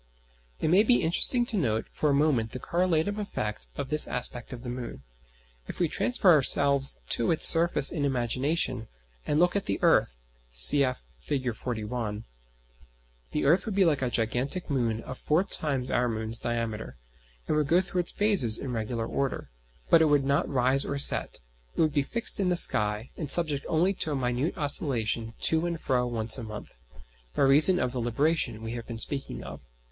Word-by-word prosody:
It - - -1
may 185 +5 +4
be 240 +3 +2
interesting 240 +9 +1
to 230 - -2
note 110 - -2
for 150 - -2
a - - +1
moment 140 -7 0
the 130 - -6
correlative 180 +5 -1
effect 105 - -5
of 135 - -6
this 150 0 +4
aspect 125 -1 -3
of 125 -1 -9
the 125 - -7
moon, 120 - -8 0.6
if - - -7
we 175 - +1
transfer 200 +2 +2
ourselves 140 -1 +3
to 115 - 0
its 160 - +6
surface 165 -4 +5
in 155 -5 -3
imagination, 130 -1 -2 0.4
and 150 - 0
look 180 +2 +2
at 200 - -1
the 100 - -2
earth - - +2 0.3
(cf. 130 - +4 0.2
Fig. 130 -5 -3
41). 110 -1 -5 1.1
The - - -3
earth 170 +10 +2
would 210 - -4
be 195 -1 +3
like 150 -5 0
a 130 - -1
gigantic 125 +9 -2
moon 115 -4 -2
of 130 - -10
four 155 +5 0
times 140 -9 -2
our 125 0 0
moon's 110 0 -4
diameter, 115 - -5 0.5
and - - -1
would 150 -2 0
go 170 +4 +3
through 185 -1 -2
its 175 - -4
phases 195 - +3
in 135 - -6
regular 115 0 -4
order. 135 - -4 0.4
But 165 - +6
it - - +4
would 145 -2 +1
not 140 +1 0
rise 130 0 +1
or 140 - -4
set: 140 - +3 0.3
it - - -8
would 155 -2 +1
be 145 - +1
fixed 230 +12 +1
in 190 -2 0
the 180 - +1
sky, 105 -7 +1
and 155 -4 -6
subject 155 -5 +3
only 175 +5 +1
to 160 -5 -3
a - - -2
minute 125 +4 -2
oscillation 120 -6 -1
to 160 +1 +2
and 170 -1 -5
fro 125 -4 -1
once 115 +1 0
a - - -7
month, 110 -1 -10 0.6
by - - +1
reason 150 +7 +6
of 125 -8 -2
the 125 -1 -4
"libration" 120 -1 -1
we 115 - -6
have 120 -1 -7
been 115 - -7
speaking 135 +4 -3
of. 70 +1 -10
135 Hz, 190 wpm, -26 LUFS, 115-160 Hz, 1.1 s, its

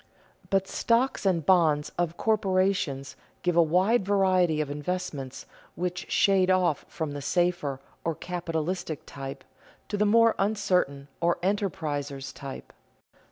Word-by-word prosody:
But 195 -1 +1
stocks 230 -1 +1
and 170 -5 +1
bonds 155 -5 +3
of 170 -1 -1
corporations 185 -10 0 0.3
give 175 -1 +1
a 170 - +7
wide 185 +8 +3
variety 185 -5 +3
of 150 -2 -1
investments 145 -3 -4 0.3
which 180 +1 -3
shade 190 -2 +4
off 180 -5 +2
from 160 -2 -4
the 145 0 -5
safer 175 -3 0 0.2
or 165 -1 -1
capitalistic 170 -2 -3
type, 135 0 -7 0.5
to 205 - -1
the 210 +1 +3
more 230 +2 +5
uncertain, 185 -9 0
or 170 0 +2
enterpriser's 145 -9 -2
type. 135 -1 -9
175 Hz, 125 wpm, -27 LUFS, 150-190 Hz, 0.5 s, a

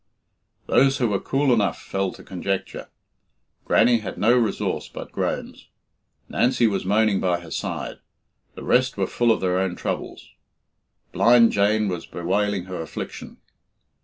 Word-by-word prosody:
Those 135 0 +3
who 120 -3 +1
were 100 -2 0
cool 135 -1 +1
enough 105 -4 +1
fell 95 -1 -2
to - - -13
conjecture. 95 +1 -4 0.8
Grannie 120 -1 +4
had 110 - -7
no 120 +4 +4
resource 120 -3 -1
but - - -8
groans. - - -4 0.6
Nancy 120 0 +2
was 100 -4 0
moaning 105 0 +2
by 90 -2 0
her 85 -2 -12
side. - - -4 0.6
The - - -9
rest 130 -1 +2
were 95 - +1
full 120 +4 +1
of 110 - 0
their 90 -1 +1
own 95 -2 -1
troubles. - - -5 0.8
Blind 115 0 +5
Jane 105 +1 +2
was 90 -3 -4
bewailing 100 +2 -1
her 90 -2 -6
affliction. 80 - -7
105 Hz, 145 wpm, -23 LUFS, 95-120 Hz, 0.8 s, Blind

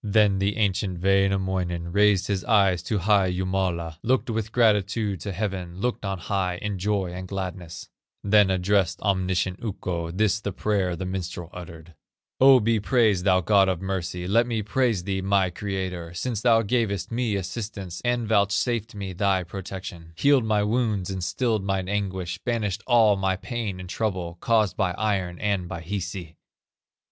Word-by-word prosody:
Then 105 -2 +3
the 100 +1 0
ancient 95 -3 0
Wainamoinen 95 -3 +1
Raised 105 -2 +4
his 100 -2 -1
eyes 100 -6 +3
to 110 - -2
high 100 -1 +3
Jumala, 90 -3 -2
Looked 125 0 +1
with 110 -1 -3
gratitude 105 -3 +2
to 100 - -4
heaven, 95 -2 -4
Looked 120 -1 -2
on 95 -1 -2
high, 90 -1 -1
in 100 0 -4
joy 100 -2 0
and 90 +1 -6
gladness, 90 -3 -6 0.4
Then 105 -1 +5
addressed 95 -1 +1
omniscient 95 0 0
Ukko, 90 -6 -3
This 105 +3 +1
the 100 -2 -4
prayer 95 -3 0
the 95 - -5
minstrel 90 -2 -5
uttered: 85 -2 -10 0.5
"O 135 0 +8
be 115 0 +1
praised, 105 -5 +2
thou 95 -2 +4
God 95 +1 +4
of 90 -3 -1
mercy, 90 -2 -3
Let 115 +5 +3
me 115 -3 -1
praise 115 -3 +1
thee, 95 0 -2
my 95 -1 +2
Creator, 90 -3 -4
Since 110 +3 -2
thou 115 -1 +4
gavest 105 -3 -1
me 115 -3 0
assistance, 100 -2 -5
And 120 -2 0
vouchsafed 110 +2 +1
me 100 -2 -5
thy 95 0 +1
protection, 90 -2 -8
Healed 140 - +3
my 105 -1 +2
wounds 105 -4 0
and 95 -2 -4
stilled 110 +2 0
mine 95 -1 -1
anguish, 95 -3 -2
Banished 110 -5 -1
all 110 -4 +5
my 95 -1 +1
pain 105 -2 -4
and 90 - -8
trouble, 90 -4 -3
Caused 110 -4 +2
by 95 -3 0
Iron 95 -4 -1
and 100 -3 -1
by 85 - -5
Hisi. 90 -2 -5
95 Hz, 165 wpm, -25 LUFS, 90-105 Hz, 0.5 s, O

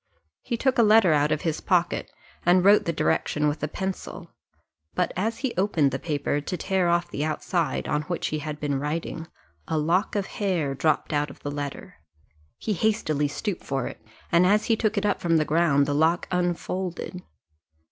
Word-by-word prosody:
He 235 - -3
took 260 +1 +1
a - - +8
letter 215 -6 +6
out 150 0 +2
of 155 - 0
his 160 -4 -2
pocket, 175 -2 0 0.3
and 180 +1 +4
wrote 205 +1 +6
the 170 - +1
direction 150 -2 0
with 150 +1 -2
a 150 - 0
pencil; 190 +4 -5 0.6
but 180 - +1
as 220 +5 -1
he 250 - -1
opened 170 -8 +2
the 135 - -3
paper, 145 -2 -1
to 180 +5 -4
tear 190 -2 +1
off 175 0 +1
the 145 - -2
outside, 160 +2 -1
on 150 - 0
which 175 - -1
he 155 - -2
had 150 0 -5
been 145 -2 -1
writing, 160 +2 -4 0.4
a 160 - -1
lock 170 +8 +1
of 200 -2 0
hair 180 -11 -1
dropped 155 +3 0
out 145 0 +1
of 140 - -13
the 145 - -4
letter; 145 -1 -6 0.6
he 215 - -2
hastily 165 -8 +1
stooped 180 +6 -4
for 135 -2 -2
it, - - -8 0.3
and 175 +1 +5
as 210 +2 +3
he 225 - +3
took 220 -1 0
it 200 - +1
up 205 - 0
from 165 -2 +3
the 155 - +2
ground 150 -3 +3
the 145 - -1
lock 160 +4 +2
unfolded. 180 0 -2
170 Hz, 195 wpm, -25 LUFS, 150-190 Hz, 0.6 s, a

